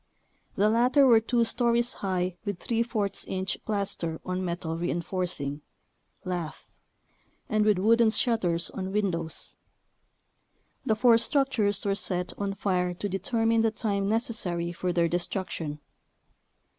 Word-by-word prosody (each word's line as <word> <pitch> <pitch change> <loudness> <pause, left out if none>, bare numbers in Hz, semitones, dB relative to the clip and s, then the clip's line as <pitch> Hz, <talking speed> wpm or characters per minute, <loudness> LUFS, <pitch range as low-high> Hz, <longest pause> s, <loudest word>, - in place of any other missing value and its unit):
The 205 - +3
latter 250 +6 +4
were 235 -4 +7
two 235 +1 +1
stories 235 +1 +1
high 185 -2 -1
with 200 -4 -5 0.3
% 200 -2 -1
inch 190 0 -1
plaster 195 -6 -2
on 185 0 -2
metal 170 -2 -3
reinforcing 170 -4 -3 0.6
(lath) 175 -4 -5 0.7
and 215 0 +2
with 210 -2 +3
wooden 225 +4 +4
shutters 205 -8 +2
on 190 0 -5
windows. 170 -6 -2 1.3
The 220 -5 +1
four 230 0 +5
structures 230 -6 +1
were 200 - +2
set 180 -2 -1
on 200 -1 -2
fire 180 -3 0
to 205 - -3
determine 225 +4 +1
the 225 - +3
time 205 -3 -1
necessary 205 -7 -1
for 180 +1 -2
their 170 -1 +2
destruction. 175 -3 -3
195 Hz, 125 wpm, -27 LUFS, 180-225 Hz, 1.3 s, were